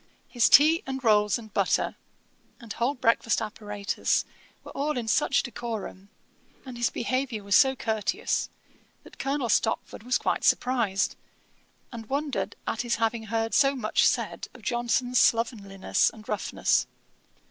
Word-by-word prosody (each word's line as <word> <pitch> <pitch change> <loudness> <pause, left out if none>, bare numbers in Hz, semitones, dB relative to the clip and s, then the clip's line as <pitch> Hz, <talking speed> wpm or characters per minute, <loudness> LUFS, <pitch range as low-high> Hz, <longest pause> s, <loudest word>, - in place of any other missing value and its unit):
His 240 -2 +2
tea 310 +4 +6
and 265 0 -4
rolls 210 -2 +3
and 220 -3 -12
butter, - - +1 0.6
and 230 -4 -8
whole 245 +5 -1
breakfast 230 -2 +1
apparatus 210 -2 -2 0.4
were - - -10
all 290 0 -2
in 235 -2 -3
such 275 +5 +2
decorum, 225 -5 -6 0.6
and 255 -2 -8
his 240 0 0
behaviour 255 -3 -2
was 200 0 +1
so 265 0 +5
courteous, 220 -4 -1 0.5
that - - -16
Colonel 275 -2 -1
Stopford 225 -2 0
was 250 +3 +1
quite - - -1
surprised, 220 -6 +1 0.8
and 225 -3 -9
wondered 270 -9 -2
at 225 - -2
his 240 -1 -1
having 225 0 -1
heard 225 +1 -2
so 275 -1 +4
much 220 -5 +2
said - - -2
of - - -14
Johnson's 245 +1 0
slovenliness 210 -4 +1
and 215 -1 -15
roughness. 210 - 0
235 Hz, 140 wpm, -26 LUFS, 215-255 Hz, 0.8 s, tea